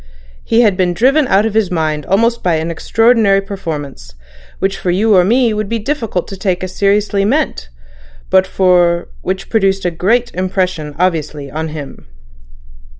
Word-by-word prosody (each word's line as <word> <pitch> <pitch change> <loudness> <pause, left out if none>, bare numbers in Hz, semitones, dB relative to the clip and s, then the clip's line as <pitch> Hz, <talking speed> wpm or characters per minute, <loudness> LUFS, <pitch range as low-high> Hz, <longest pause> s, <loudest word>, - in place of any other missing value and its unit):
He 230 +1 +2
had 210 -5 +3
been 180 -2 0
driven 270 - +3
out 200 0 +3
of 225 - -2
his 215 -4 +1
mind 155 -4 -2
almost 230 +5 +1
by 175 -2 +1
an 160 +1 -2
extraordinary 225 +2 +2
performance, 150 - -7 0.4
which 195 0 -1
for 180 - -2
you 205 +4 +3
or 180 - +5
me 235 +5 +2
it - - -1
would 215 -1 -3
be 230 - -1
difficult 225 - -3
to 195 - -6
take 185 -1 -2
as 185 - -5
seriously 200 0 +1
meant, 250 - -1 0.6
but 190 0 +4 0.7
which 190 +1 -4
produced 195 -4 +1
a 175 - +1
great 230 +9 0
impression 180 -5 -2
obviously 155 -5 -2
on 160 +2 -3
him." 150 - -9
190 Hz, 165 wpm, -15 LUFS, 170-220 Hz, 0.7 s, or